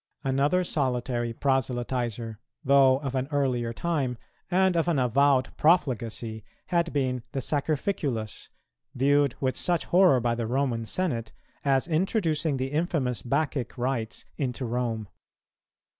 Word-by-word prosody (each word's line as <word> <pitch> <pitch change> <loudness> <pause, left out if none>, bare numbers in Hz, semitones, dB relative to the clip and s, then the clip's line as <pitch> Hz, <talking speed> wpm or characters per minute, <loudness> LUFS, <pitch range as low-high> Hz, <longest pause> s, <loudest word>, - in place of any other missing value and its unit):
Another 140 +7 +2
solitary 125 -6 -1
proselytizer, 120 -3 -1 0.3
though 135 -1 +6
of 135 -3 -3
an 130 0 -1
earlier 130 -5 0
time 135 -3 -1 0.3
and 185 0 +3
of 165 0 +1
an 170 -4 +2
avowed 130 +1 +2
profligacy, 120 - +1 0.3
had 170 -2 +1
been 130 -3 0
the 135 - -1
Sacrificulus, 140 - -2 0.5
viewed 140 0 +3
with 130 -1 0
such 175 -1 0
horror 180 -7 +5
by 120 0 0
the 115 -1 -2
Roman 120 -3 -1
Senate, 120 -11 -2 0.3
as 135 +1 +2
introducing 165 - +1
the 130 +1 -3
infamous 150 -6 0
Bacchic 135 -1 -1
rites 120 -3 -2
into 130 -2 -2
Rome. 115 -3 -2
135 Hz, 125 wpm, -27 LUFS, 120-150 Hz, 0.5 s, though